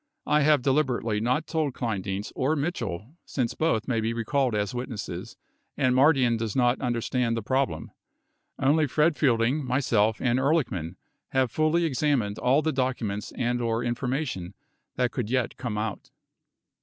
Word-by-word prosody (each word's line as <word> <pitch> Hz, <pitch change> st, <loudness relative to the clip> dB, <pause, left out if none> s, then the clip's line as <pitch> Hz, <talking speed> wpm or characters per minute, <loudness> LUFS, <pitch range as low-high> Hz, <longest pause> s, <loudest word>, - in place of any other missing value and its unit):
I 150 Hz, 0 st, +3 dB
have 150 Hz, -3 st, +4 dB
deliberately 130 Hz, -6 st, +1 dB
not 125 Hz, +8 st, 0 dB
told 155 Hz, -6 st, -1 dB
Kleindienst 100 Hz, -3 st, -3 dB
or 140 Hz, +5 st, +1 dB
Mitchell 135 Hz, -, -4 dB
since 125 Hz, -4 st, -2 dB
both 140 Hz, -9 st, 0 dB
may 115 Hz, -4 st, 0 dB
be 115 Hz, +1 st, -1 dB
recalled 125 Hz, +1 st, 0 dB
as 105 Hz, 0 st, -1 dB
witnesses 120 Hz, -3 st, -5 dB, 0.4 s
and 130 Hz, -2 st, +2 dB
Mardian 130 Hz, -4 st, +4 dB
does 110 Hz, -2 st, -3 dB
not 125 Hz, -1 st, +2 dB
understand 120 Hz, -1 st, 0 dB
the 115 Hz, -, -3 dB
problem. 120 Hz, -10 st, -1 dB, 0.7 s
Only 150 Hz, +3 st, +3 dB
Fred 150 Hz, +4 st, +2 dB
Fielding, 130 Hz, +1 st, +2 dB
myself, 115 Hz, -5 st, +1 dB
and 125 Hz, 0 st, +1 dB
Ehrlichman 130 Hz, -, 0 dB, 0.4 s
have 130 Hz, -3 st, +2 dB
fully 155 Hz, +4 st, +2 dB
examined 130 Hz, -8 st, 0 dB
all 135 Hz, +5 st, +3 dB
the 160 Hz, -, +1 dB
documents 125 Hz, -6 st, -2 dB
and/ 120 Hz, 0 st, -1 dB
or 115 Hz, 0 st, 0 dB
information 120 Hz, -, -3 dB, 0.4 s
that 125 Hz, -1 st, +1 dB
could 115 Hz, -4 st, -3 dB
yet 125 Hz, -1 st, 0 dB
come 115 Hz, -4 st, -4 dB
out 105 Hz, -1 st, -4 dB
125 Hz, 150 wpm, -26 LUFS, 115-140 Hz, 0.7 s, have